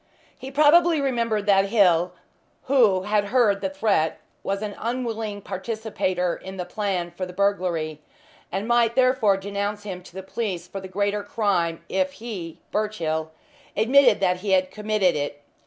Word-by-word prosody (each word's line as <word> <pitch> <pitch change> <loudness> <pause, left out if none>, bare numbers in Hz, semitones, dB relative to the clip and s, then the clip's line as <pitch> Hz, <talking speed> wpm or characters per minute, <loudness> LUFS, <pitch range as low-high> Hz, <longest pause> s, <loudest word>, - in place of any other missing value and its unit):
He 260 - -8
probably 310 +4 +5
remembered 235 -6 0
that 195 -1 +4
Hill, 180 -5 +3 0.5
who 230 -9 +3
had 210 0 +1
heard 205 -3 +2
the 190 - -1
threat, 190 -5 0 0.2
was 195 +1 -2
an 210 -1 -4
unwilling 225 -4 -3
participator 190 -3 -2
in 190 0 -9
the 180 - -3
plan 180 -2 -2
for 185 +1 -5
the 180 - -10
burglary, 175 -6 -1 0.5
and 195 +3 -3
might 235 -1 +3
therefore 255 -6 +3
denounce 200 +1 -3
him 185 -3 -6
to 180 - -16
the 190 - -6
police 190 -4 -4
for 195 +1 -7
the 190 - -7
greater 205 +2 -1
crime 185 -6 -1
if 185 0 0
he 195 -8 -7
(Birchill) 165 -7 -1 0.5
admitted 245 +1 +5
that 180 -1 +2
he 195 +1 -1
had 185 0 +2
committed 210 -3 +1
it. 145 0 -4
200 Hz, 155 wpm, -24 LUFS, 185-220 Hz, 0.5 s, probably